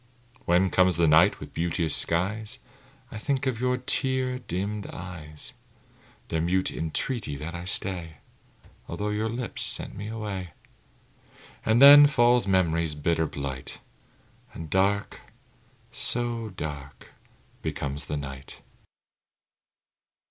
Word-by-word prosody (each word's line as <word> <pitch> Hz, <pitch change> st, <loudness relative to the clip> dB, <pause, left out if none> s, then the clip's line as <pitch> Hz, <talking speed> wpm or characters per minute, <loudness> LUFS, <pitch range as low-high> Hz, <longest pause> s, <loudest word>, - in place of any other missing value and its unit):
When 90 Hz, +2 st, +3 dB
comes 90 Hz, -2 st, +4 dB
the 85 Hz, -1 st, +4 dB
night 80 Hz, +3 st, +5 dB
with -, -, -10 dB
beauteous 85 Hz, -1 st, 0 dB
skies, 100 Hz, +6 st, -1 dB, 0.5 s
I 110 Hz, -, -6 dB
think 135 Hz, +3 st, -1 dB
of 125 Hz, -3 st, -1 dB
your 125 Hz, 0 st, +1 dB
tear 130 Hz, 0 st, 0 dB
dimmed 100 Hz, -1 st, -4 dB
eyes, 80 Hz, -4 st, -7 dB, 0.8 s
Their 80 Hz, -, 0 dB
mute 95 Hz, +3 st, +1 dB
entreaty 80 Hz, -, -2 dB
that 75 Hz, +4 st, -6 dB
I 85 Hz, +1 st, -6 dB
stay, 90 Hz, -4 st, -2 dB, 0.7 s
Although 105 Hz, +1 st, -3 dB
your 105 Hz, +2 st, -1 dB
lips 120 Hz, +1 st, -4 dB
sent -, -, -4 dB
me 105 Hz, +2 st, -6 dB
away; 105 Hz, -6 st, -5 dB, 1.1 s
And 110 Hz, +2 st, +3 dB
then 145 Hz, +1 st, +11 dB
falls 120 Hz, -5 st, +3 dB
memory's 85 Hz, -4 st, +1 dB
bitter 80 Hz, +2 st, 0 dB
blight, 70 Hz, -3 st, -6 dB, 0.7 s
And 80 Hz, -2 st, -8 dB
dark 100 Hz, +2 st, +1 dB, 0.7 s
so 120 Hz, -2 st, -1 dB
dark 75 Hz, -6 st, -8 dB, 0.5 s
becomes 70 Hz, -2 st, -4 dB
the 75 Hz, -, -3 dB
night. 65 Hz, -1 st, -8 dB
95 Hz, 115 wpm, -27 LUFS, 80-110 Hz, 1.1 s, then